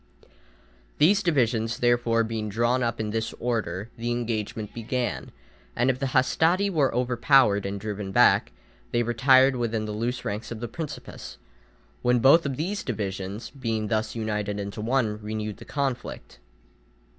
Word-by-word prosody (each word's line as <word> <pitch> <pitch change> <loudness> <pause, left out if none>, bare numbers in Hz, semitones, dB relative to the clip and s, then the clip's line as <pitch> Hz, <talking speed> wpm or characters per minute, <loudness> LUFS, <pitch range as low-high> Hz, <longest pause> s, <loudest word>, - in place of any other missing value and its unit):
These 195 +6 +5
divisions, 120 - +1
therefore, 120 -1 +2
being 110 -1 -3
drawn 120 +4 +1
up 115 -2 -1
in 105 -1 -2
this 115 +1 -2
order, 110 -4 -2
the 120 +1 -3
engagement 115 -3 -3
began, 120 +2 -3 0.5
and 125 +2 +3
if 130 - -6
the 135 - -1
hastati 165 +10 +2
were 145 -7 +2
overpowered 120 -4 +3
and 100 0 -4
driven 105 -1 -5
back, - - +4 0.4
they 120 0 +1
retired 130 +3 +4
within 115 -2 -1
the 105 - -4
loose 120 +4 -3
ranks 105 +2 -4
of 115 - -6
the 120 - -4
principes, 150 +6 -7 0.6
when 125 0 +3
both 135 +7 +6
these 160 +9 -2
divisions, 100 -2 -4
being 115 -6 -3
thus 110 0 -1
united 105 -2 -2
into 100 +1 -5
one, 110 -2 0
renewed 105 0 -4
the - - -12
conflict. 135 - -4
115 Hz, 145 wpm, -26 LUFS, 110-130 Hz, 0.6 s, both